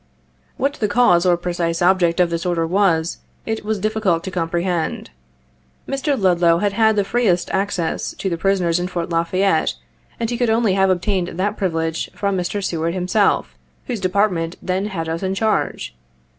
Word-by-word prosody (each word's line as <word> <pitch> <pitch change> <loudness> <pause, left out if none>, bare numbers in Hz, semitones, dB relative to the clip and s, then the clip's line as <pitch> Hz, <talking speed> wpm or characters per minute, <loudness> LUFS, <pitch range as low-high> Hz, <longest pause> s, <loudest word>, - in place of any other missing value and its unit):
What 280 +2 0
the 220 -7 -1
cause 190 -6 +4
or 175 -1 +4
precise 170 -1 -2
object 175 -1 +3
of 175 -1 +3
this 170 0 -2
order 175 -2 0
was, 170 -2 +1 0.3
it 220 -1 -3
was 215 0 -1
difficult 200 -5 0
to 190 - -5
comprehend. 170 - -2 0.8
Mr. 275 0 -1
Ludlow 175 -3 +3
had 200 +2 0
had 220 +1 +3
the 205 - +2
freest 195 -5 +1
access 190 -4 -1
to - - -4
the 175 - 0
prisoners 180 -1 +1
in 180 - -2
Fort 175 -1 -4
La 165 0 +2
Fayette, 185 -1 +1 0.4
and 230 - -1
he 240 - -3
could 245 -2 +2
only 220 -3 +2
have 190 0 +3
obtained 185 0 0
that 195 +5 -2
privilege 165 -5 -2
from 200 -1 -1
Mr. 190 +3 -2
Seward 165 -1 -1
himself, 185 +3 +1 0.3
whose 240 -4 -3
Department 185 -3 0
then 190 +2 -2
had 165 -6 -4
us 165 +1 -3
in 190 0 -1
charge. 215 - -1
185 Hz, 175 wpm, -20 LUFS, 170-205 Hz, 0.8 s, cause